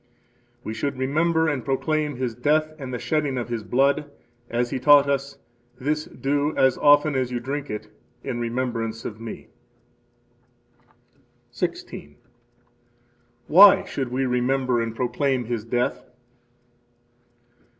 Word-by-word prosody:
We 110 - -5
should 135 +5 -3
remember 160 +5 +1
and 145 -5 -1
proclaim 150 +2 -1
His 125 -2 -3
death 155 +6 +1
and 135 -2 -6
the 125 - -3
shedding 145 0 -1
of 120 -1 -4
His 115 -2 -3
blood, 140 +5 +1 0.4
as 120 +1 -1
He 130 - -2
taught 145 +2 +6
us: 140 0 -2 0.4
This 150 +3 -1
do, 145 +2 -2
as 130 -1 +4
often 145 +1 +5
as 130 -2 -1
you 120 - -2
drink 140 +4 -5
it, 105 0 -5 0.4
in 130 -3 -4
remembrance 115 -2 -3
of 110 0 -7
Me. 115 -1 -8 2.0
16. 75 0 -5 1.3
Why 195 +8 +8
should 135 -3 -4
we 130 +2 -1
remember 125 0 +1
and 115 -1 -4
proclaim 125 +1 -1
His 115 -2 -3
death? 120 +2 -1
130 Hz, 130 wpm, -24 LUFS, 120-145 Hz, 2.0 s, Why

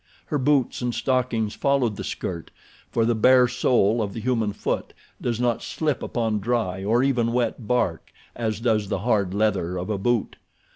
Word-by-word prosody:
Her 150 - -1
boots 135 -2 +1
and 125 -1 -1
stockings 125 -5 0
followed 135 -6 +1
the - - -6
skirt, 85 -3 -5 0.4
for 115 - +2
the 120 - +2
bare 125 +3 +5
sole 120 -3 +2
of 100 -2 -3
the - - -3
human 115 -2 0
foot 105 - -3 0.3
does 120 -2 -1
not 120 -1 +1
slip 150 -5 -2
upon 110 -3 -1
dry 100 -4 -1
or 115 +5 +2
even 120 -4 +1
wet 120 -2 -1
bark 110 -9 0 0.2
as 110 -2 -2
does 110 -4 +1
the - - 0
hard 100 -6 +1
leather 100 -4 0
of 90 +4 -3
a 100 - -1
boot. 120 +1 0
115 Hz, 180 wpm, -24 LUFS, 105-125 Hz, 0.4 s, bare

